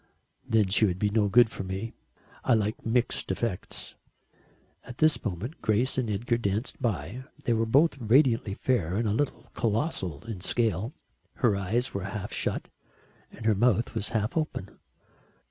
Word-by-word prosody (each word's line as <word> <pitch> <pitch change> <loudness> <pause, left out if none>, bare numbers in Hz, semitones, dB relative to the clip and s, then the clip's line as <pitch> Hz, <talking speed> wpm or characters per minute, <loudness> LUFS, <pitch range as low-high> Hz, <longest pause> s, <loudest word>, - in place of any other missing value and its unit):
"Then 110 -4 +3
she 105 +3 +4
would 90 -3 0
be 105 +1 +1
no 105 -1 +2
good 115 +2 +6
to - - -5
me. 95 +4 -4 0.5
I 125 - +4
like 105 0 -1
mixed 120 +2 0
effects." 115 -7 -3 0.9
At 125 - -10
this 155 0 +3
moment 105 - -4
Grace 110 +4 +1
and 125 -4 -1
Edgar 115 +3 0
danced 105 +4 -2
by. 110 - -2 0.2
They 120 - +2
were 115 0 +1
both 140 +5 +4
radiantly 115 -3 +3
fair 95 -10 0
and 110 +2 +1
a 105 - +1
little 125 -1 -1
colossal 110 - -1
in 110 -6 -6
scale. 115 - +1 0.4
Her 115 -6 +2
eyes 105 +6 0
were 100 -2 -3
half 100 0 -5
shut - - -2 0.6
and 110 - -10
her 110 - +5
mouth 115 +2 +2
was 110 -2 -2
half 110 0 -1
open. 155 - -3
110 Hz, 160 wpm, -28 LUFS, 100-120 Hz, 0.9 s, good